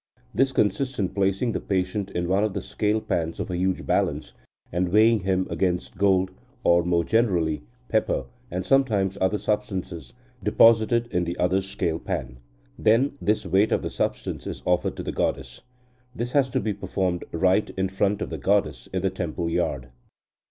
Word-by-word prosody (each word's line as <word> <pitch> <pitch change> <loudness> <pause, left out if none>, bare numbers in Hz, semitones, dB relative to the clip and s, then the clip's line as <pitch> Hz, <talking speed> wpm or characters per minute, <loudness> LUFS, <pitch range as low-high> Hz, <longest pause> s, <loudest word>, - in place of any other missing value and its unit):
This 135 0 +2
consists 130 +3 0
in 95 -3 0
placing 100 +4 0
the - - -2
patient 95 +1 -1
in 85 0 -2
one 95 +3 +2
of 105 -2 -1
the 100 - -1
scale 105 +1 0
pans 80 -4 -2
of - - -3
a - - -2
huge 95 +1 -1
balance, - - 0 0.4
and 90 +1 0
weighing 110 +4 +5
him 95 -1 0
against 90 -2 -1
gold, 95 -1 +2 0.3
or, 85 0 +5
more 85 0 +1
generally, 85 -9 +1 0.3
pepper 110 -1 0 0.2
(and 90 +1 -3
sometimes 105 -9 +2
other 95 +3 +2
substances), 95 -4 -3 0.3
deposited 115 +2 +4
in 90 -2 +1
the 85 +1 -4
other 90 +2 +2
scale 95 -4 -2
pan. - - -4 0.4
Then 115 +6 +3
this 105 +1 +1
weight 100 +3 +3
of - - +1
the - - -3
substance - - -3
is - - -6
offered 90 0 +1
to - - -4
the - - -3
goddess. 65 -2 -2 0.5
This 120 0 -3
has 135 -2 +3
to - - 0
be 110 - -1
performed 95 -2 -2
right 95 +5 +2
in 95 0 +1
front 100 +2 0
of - - -7
the - - -4
goddess 100 +1 0
in 95 -1 -2
the 95 - +1
temple 85 -2 -3
yard." 65 -5 -1
95 Hz, 180 wpm, -25 LUFS, 90-105 Hz, 0.5 s, weighing